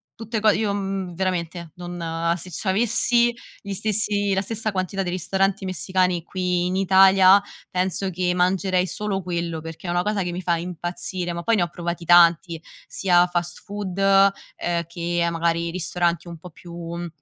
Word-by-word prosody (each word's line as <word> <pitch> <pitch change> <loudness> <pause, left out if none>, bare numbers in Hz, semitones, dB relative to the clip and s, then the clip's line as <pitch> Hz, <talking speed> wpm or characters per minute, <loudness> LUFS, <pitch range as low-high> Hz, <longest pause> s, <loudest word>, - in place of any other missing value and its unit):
tutte 225 0 -4
co 215 - +5
io, 210 -1 0
mhmm, 195 -3 -3
veramente, 175 -2 -3
non 170 -2 -3
se 180 +1 -9
c'avessi 235 +5 +2 0.3
gli 200 -1 -5
stessi 205 0 0
la 190 - +1
stessa 220 +1 -3
quantità 190 0 -2
di 180 - -3
ristoranti 190 +2 0
messicani 185 0 0
qui 180 0 -1
in 185 - -2
Italia, 190 0 +6 0.3
penso 185 +1 -1
che 180 0 0
mangerei 185 0 +1
solo 200 -2 -3
quello 170 -2 -3
perché 165 +3 -9
è - - -2
una 175 +1 +1
cosa 210 -1 -1
che 175 - -3
mi 180 - -4
fa 170 -2 +1
impazzire. 175 +1 -4
Ma 170 - -4
poi 230 +3 +2
ne 180 - +2
ho 175 - -1
provati 170 0 -5
tanti, 170 -1 +5 0.3
sia 180 -2 +3
fast 175 -1 -3
food, 200 -2 -5
ehm, 195 -3 +2
che, 170 0 -1
magari, 170 0 0
ristoranti 175 -1 -1
un 170 -1 -8
po' 175 +1 -12
più, 170 +2 -13 0.2
mhmm, 175 0 -4
180 Hz, 170 wpm, -23 LUFS, 170-195 Hz, 0.3 s, Italia